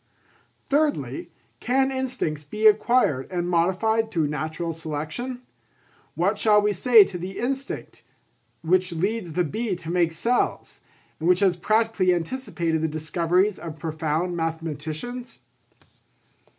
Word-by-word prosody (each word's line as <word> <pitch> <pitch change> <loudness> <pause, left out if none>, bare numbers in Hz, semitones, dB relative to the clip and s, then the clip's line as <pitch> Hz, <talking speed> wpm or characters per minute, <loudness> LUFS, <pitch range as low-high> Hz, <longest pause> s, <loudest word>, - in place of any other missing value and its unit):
Thirdly, 295 +1 0 0.3
can 265 +2 +1
instincts 255 - -2
be 215 +9 -4
acquired 215 - +4
and 175 -1 -1
modified 190 +6 +1
through 160 -8 0
natural 155 +3 -3
selection? 160 - -5 0.7
What 195 +5 +1
shall 210 -2 +5
we 210 0 +1
say 225 +3 +7
to 185 -2 -6
the 185 +3 -6
instinct 270 +3 -4 0.6
which 185 +2 +2
leads 190 +1 -2
the 180 +2 +2
bee 210 +5 -2
to 170 -1 -7
make 170 -2 +2
cells, 235 +9 -1 0.4
and 165 +2 0
which 180 +2 +4
has 190 -3 +4
practically 215 -1 +2
anticipated 170 -4 -2
the 160 - +1
discoveries 170 +5 0
of 160 -2 -7
profound 160 +2 -2
mathematicians? 165 - -4
180 Hz, 125 wpm, -24 LUFS, 160-225 Hz, 0.7 s, say